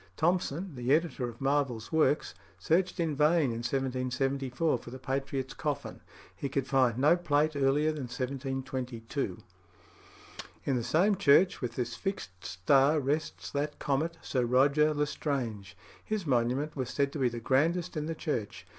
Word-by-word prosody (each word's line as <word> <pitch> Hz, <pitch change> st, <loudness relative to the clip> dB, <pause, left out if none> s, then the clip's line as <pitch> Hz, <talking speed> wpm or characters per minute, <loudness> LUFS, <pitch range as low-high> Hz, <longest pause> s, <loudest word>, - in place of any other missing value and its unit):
Thompson, 175 Hz, +1 st, 0 dB
the 125 Hz, 0 st, -2 dB
editor 155 Hz, -6 st, -1 dB
of 115 Hz, -, -12 dB
Marvell's 135 Hz, -5 st, 0 dB
works, 155 Hz, -2 st, +2 dB, 0.2 s
searched 180 Hz, +3 st, +1 dB
in 160 Hz, -3 st, 0 dB
vain 150 Hz, -1 st, +3 dB
in 115 Hz, -, -3 dB
1774 130 Hz, +2 st, -1 dB
for 120 Hz, -, -11 dB
the 130 Hz, -, -7 dB
patriot's 135 Hz, 0 st, -3 dB
coffin. -, -, -4 dB, 0.3 s
He 140 Hz, -, -4 dB
could 135 Hz, -1 st, -1 dB
find 130 Hz, -4 st, +2 dB
no 150 Hz, +6 st, +5 dB
plate 155 Hz, -3 st, +1 dB
earlier 140 Hz, +3 st, +2 dB
than 150 Hz, -4 st, -4 dB
1722. 130 Hz, -3 st, -4 dB, 1.2 s
In 135 Hz, -, +1 dB
the 120 Hz, -, -1 dB
same 175 Hz, -, +3 dB
church 180 Hz, +1 st, +4 dB
with 120 Hz, -2 st, -3 dB
this 120 Hz, -1 st, -2 dB
fixed 90 Hz, -, -5 dB
star 135 Hz, -, +3 dB
rests 145 Hz, +3 st, -2 dB
that 145 Hz, +1 st, -2 dB
comet, 150 Hz, +4 st, -1 dB
Sir 130 Hz, -2 st, 0 dB
Roger 140 Hz, +5 st, +4 dB
l'Estrange. 130 Hz, -, -2 dB, 0.3 s
His 215 Hz, -4 st, -3 dB
monument 130 Hz, +3 st, 0 dB
was 130 Hz, -3 st, -3 dB
said 140 Hz, -1 st, 0 dB
to 150 Hz, -, -4 dB
be 130 Hz, -2 st, +3 dB
the 120 Hz, 0 st, -6 dB
grandest 155 Hz, +9 st, +1 dB
in 155 Hz, 0 st, -2 dB
the 165 Hz, -, -3 dB
church. 115 Hz, -10 st, -3 dB
140 Hz, 155 wpm, -30 LUFS, 125-155 Hz, 1.2 s, no